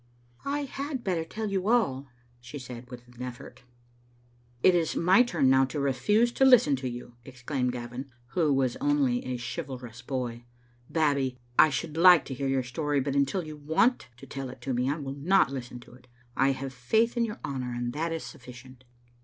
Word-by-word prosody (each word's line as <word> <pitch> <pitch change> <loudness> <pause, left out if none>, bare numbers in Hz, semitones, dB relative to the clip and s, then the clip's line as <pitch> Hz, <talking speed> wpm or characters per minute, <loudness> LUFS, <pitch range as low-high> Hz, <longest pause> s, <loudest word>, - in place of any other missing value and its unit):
" 120 - -34
I 285 +1 -1
had 275 -1 -5
better 175 -4 0
tell 215 +5 -5
you 195 0 -1
all," 190 - +1 0.3
she 120 +4 -9
said, 125 -2 -9
with 120 -1 -10
an 125 - -18
eflFort 125 -1 -8 1.0
"It 185 - +7
is 170 -3 +1
my 185 +6 +5
turn 170 - +2
now 135 0 +5
to 145 +3 -5
refuse 210 - +2
to 265 - +1
listen 250 - +6
to 130 -1 -4
you," 120 0 -9
ex 130 -1 -14
claimed 125 -2 0
Gavin, 125 +2 -6 0.2
who 160 -1 +1
was 135 -3 +1
only 280 -3 +1
a 125 -1 -3
chivalrous 125 -3 -6
boy. 120 -3 -4 0.2
" 120 0 -33
Bab 150 -3 +3
bie, 130 -2 -2 0.2
I 155 - +8
should 150 +3 -4
like 175 -3 +7
to 135 - -5
hear 135 +2 -3
your 135 -1 +1
story, 145 +4 -1
but 135 +1 -2
until 140 +6 +1
you 155 -1 -8
want 160 - +1
to 135 - -12
tell 135 0 -6
it 125 - -10
to 135 - -2
me 125 +2 0
I 145 - -1
will 135 -3 -5
not 160 +3 +3
listen 125 -2 -6
to 120 - -16
it. 125 0 -18 0.3
I 135 +1 +3
have 135 0 -6
faith 220 - +1
in 235 - +2
your 225 -1 -4
honour, 130 -3 -4
and 120 0 -3
that 165 +3 -2
is 165 -1 -3
sufficient." 130 +1 -12
135 Hz, 210 wpm, -28 LUFS, 125-175 Hz, 1.0 s, I